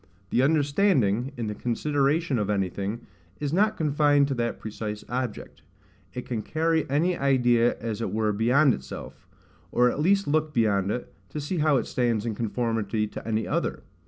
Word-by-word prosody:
The 125 Hz, -, +3 dB
understanding, 140 Hz, -, +2 dB
in 115 Hz, -, -3 dB
the 105 Hz, -, -3 dB
consideration 140 Hz, +5 st, 0 dB
of 105 Hz, -1 st, -1 dB
anything, 100 Hz, +2 st, -2 dB, 0.3 s
is 145 Hz, 0 st, -2 dB
not 215 Hz, +4 st, +2 dB
confined 145 Hz, -2 st, +3 dB
to -, -, 0 dB
that 120 Hz, -2 st, -2 dB
precise 105 Hz, -1 st, -5 dB
object: 125 Hz, -2 st, -4 dB, 0.5 s
it 125 Hz, -, -5 dB
can 115 Hz, -4 st, -3 dB
carry 160 Hz, +4 st, 0 dB
any 165 Hz, +6 st, +2 dB
idea 120 Hz, -4 st, +3 dB
as 115 Hz, -1 st, -4 dB
it -, -, -2 dB
were 110 Hz, -1 st, 0 dB
beyond 125 Hz, +6 st, +4 dB
itself, 65 Hz, +6 st, -8 dB, 0.4 s
or 125 Hz, 0 st, +4 dB
at -, -, -5 dB
least 195 Hz, +5 st, +3 dB
look 155 Hz, +1 st, 0 dB
beyond 100 Hz, -4 st, +2 dB
it, 120 Hz, +3 st, -4 dB, 0.2 s
to 150 Hz, -, -5 dB
see 155 Hz, +4 st, -3 dB
how 150 Hz, -2 st, +3 dB
it -, -, -1 dB
stands 120 Hz, -3 st, 0 dB
in 115 Hz, -, -1 dB
conformity 115 Hz, -1 st, -1 dB
to -, -, -8 dB
any 110 Hz, 0 st, -1 dB
other. -, -, -2 dB
125 Hz, 170 wpm, -26 LUFS, 110-150 Hz, 0.5 s, beyond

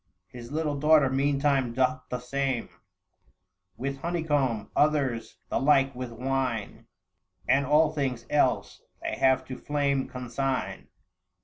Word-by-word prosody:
His 120 Hz, -1 st, -10 dB
little 150 Hz, -2 st, -1 dB
daughter 150 Hz, -2 st, +5 dB
meantime 140 Hz, -2 st, +1 dB
doth 130 Hz, +1 st, +1 dB
the 125 Hz, -, -2 dB
same 130 Hz, 0 st, -2 dB, 1.1 s
With 135 Hz, +2 st, -4 dB
honeycomb; 145 Hz, -9 st, -1 dB
others 140 Hz, -6 st, +1 dB
the -, -, 0 dB
like 135 Hz, -1 st, +4 dB
with 125 Hz, -1 st, -6 dB
wine; 125 Hz, -3 st, -3 dB, 0.6 s
And 140 Hz, 0 st, +3 dB
all 150 Hz, +2 st, +4 dB
things 130 Hz, -6 st, -2 dB
else 145 Hz, -3 st, +1 dB, 0.2 s
they -, -, -2 dB
have 130 Hz, -1 st, +3 dB
to 130 Hz, -, -6 dB
flame 140 Hz, -2 st, 0 dB
consign. 130 Hz, +1 st, -3 dB
135 Hz, 120 wpm, -27 LUFS, 125-145 Hz, 1.1 s, daughter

